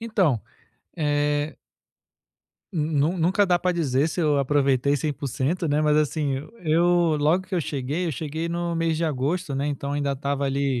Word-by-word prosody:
Então, 190 - +1 0.6
eh 145 -1 0 1.2
Nun 155 0 +1
nunca 190 +5 +3
dá 175 -1 +3
pra 180 +1 0
dizer 145 -4 +1
se 175 - -3
eu 150 -3 +2
aproveitei 140 0 +2
100% 145 +3 -2
né. 145 +1 +2
Mas, 150 -1 +3
assim, 150 -2 +1 0.3
eu, 170 0 +3
logo 155 +6 +2
que 185 - -4
eu 175 - +1
cheguei, 145 +4 -2
eu 160 - -1
cheguei 160 +4 -4
no 170 0 -2
mês 165 -1 0
de 165 - 0
agosto, 150 +2 -1
né. 140 +2 -1
Então 140 -1 -3
ainda 145 -1 0
estava 140 +1 -2
ali 135 -2 0
150 Hz, 165 wpm, -24 LUFS, 140-170 Hz, 1.2 s, nunca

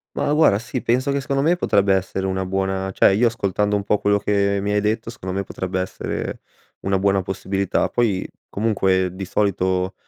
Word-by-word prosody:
Ma 145 - 0
guarda, 150 -10 +5
sì, 120 +3 -4
penso 130 +4 +1
che 140 0 0
secondo 135 0 -1
me 170 +3 +3
potrebbe 100 - +2
essere 95 0 -1
una 95 0 -1
buona 95 0 -1
cioè 95 - +4
io 115 +5 +3
ascoltando 105 -2 0
un 100 - -1
po' 105 0 +1
quello 105 0 +2
che 100 0 +1
mi 100 +1 -1
hai 105 0 +2
detto, 110 +2 -1
secondo 95 -4 -7
me 100 +1 -2
potrebbe 95 0 -4
essere 95 - -4 0.4
una 95 0 0
buona 100 0 +2
possibilità. 95 0 -1
Poi 110 -6 0 0.2
comunque, 95 -4 +1
di 95 +1 -5
solito, 95 -1 0
100 Hz, 190 wpm, -21 LUFS, 95-105 Hz, 0.4 s, guarda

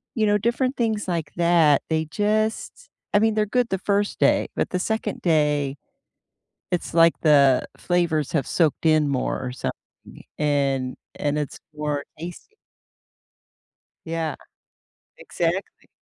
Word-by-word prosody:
you 220 - +2
know, 205 - +3
different 240 +5 0
things 220 -4 -1
like 170 -4 -2
that, 170 -4 +4
they 160 0 0
just 215 - -1 0.2
I 205 - +5
mean, 220 +1 +3
they're 215 -1 +2
good 245 +2 +1
the 190 - 0
1st 205 +1 0
day, - - +3
but - - -1
the 180 - -1
2nd 220 +1 -2
day, 150 -4 +1 0.9
it's 175 - -2
like 165 0 +6
the 140 -4 +4
flavors 170 -5 0
have 145 -6 0
soaked 165 -2 +1
in 155 -2 +4
more, 130 -2 -1
or 125 - -3
something, - - -8 0.2
and 140 -3 0 0.2
and 150 0 -1
it's 150 - -5 0.2
more 150 -1 -2 0.2
tasty. 175 - -9 1.5
Yeah. 165 -3 -2 0.8
Exactly. - - -3
165 Hz, 135 wpm, -23 LUFS, 150-205 Hz, 1.5 s, like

